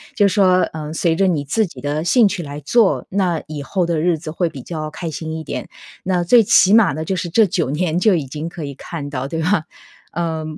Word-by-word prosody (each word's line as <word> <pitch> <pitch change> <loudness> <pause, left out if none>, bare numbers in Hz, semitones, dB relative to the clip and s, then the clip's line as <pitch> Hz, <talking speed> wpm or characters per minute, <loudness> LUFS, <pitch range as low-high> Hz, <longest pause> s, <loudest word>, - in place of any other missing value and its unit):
就 205 - +4
说， 185 -2 +3
呃， 155 -1 -6
随 165 0 +1
着 195 +3 +2
你 160 -6 0
自 220 +10 +1
己 165 -8 -11
的 145 +3 -2
兴 220 +6 +4
趣 180 -3 -3
来 145 -1 -7
做， 205 - +2
那 180 -4 0
以 150 -2 -6
后 180 +5 -1
的 170 -2 -1
日 170 0 +2
子 155 0 -8
会 170 +1 -1
比 135 - -9
较 155 +1 -5
开 165 +2 -5
心 160 +1 -6
一 160 - -6
点。 - - -6 0.3
那 180 -1 0
最 230 +7 +5
起 195 -1 +5
码 225 -2 +6
呢 155 +3 -4
就 190 - -1
是 175 -1 -3
这 215 +6 +4
9 170 -6 -1
年 160 +3 -1
就 210 +2 +4
已 155 -5 -2
经 150 +5 -5
可 170 -1 -8
以 140 - -6
看 145 0 -7
到， 135 -1 -4
对 160 +3 -3
吧？ 170 0 +1 0.5
呃， 160 -1 -2
165 Hz, 255 characters per minute, -19 LUFS, 155-185 Hz, 0.5 s, 码